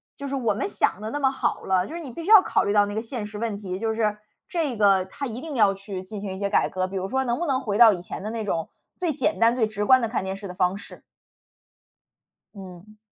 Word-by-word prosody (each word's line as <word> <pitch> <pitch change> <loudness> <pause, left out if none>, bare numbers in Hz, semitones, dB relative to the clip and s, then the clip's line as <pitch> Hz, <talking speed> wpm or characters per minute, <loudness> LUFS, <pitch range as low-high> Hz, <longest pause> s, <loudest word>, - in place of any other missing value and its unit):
就 280 - -6
是 275 - -3
我 235 -6 +1
们 200 0 -3
想 200 - 0
得 215 - -4
那 290 - -3
么 265 -2 +2
好 265 - -2
了， 185 0 +1
就 325 - -8
是 340 - -5
你 280 -6 -8
必 335 - -7
须 360 - -5
要 430 -3 +10
考 - - +1
虑 200 - 0
到 205 -1 +5
那 205 - -5
个 215 - -2
现 230 -1 -5
实 210 0 -8
问 225 -2 -2
题， 190 -2 -5
就 220 0 -1
是， 210 -2 0 0.3
这 305 -9 -2
个 195 -3 +4
它 190 +9 -6
一 240 -1 -5
定 310 -2 -6
要 205 -5 +4
去 195 -1 -7
进 200 +2 -8
行 195 -2 -5
一 - - -8
些 200 0 -1
改 - - +3
革， 185 0 -2
比 195 - -8
如 190 0 -3
说 265 +1 0
能 240 0 -1
不 345 - -2
能 265 -2 +1
回 205 -5 -2
到 230 -3 +9
以 180 - -5
前 180 - -7
的 215 - -3
那 225 0 -3
种， 165 -5 -2 0.3
最 355 -3 0
简 310 - -1
单 230 +1 +4
最 230 -4 +2
直 210 -1 -3
观 260 +3 +6
的 230 - 0
看 225 -3 -2
电 190 0 -4
视 200 - -8
的 180 - -7
方 180 +1 +1
式。 205 - -11 1.5
嗯。 190 +2 -12
215 Hz, 305 characters per minute, -24 LUFS, 195-255 Hz, 1.5 s, 要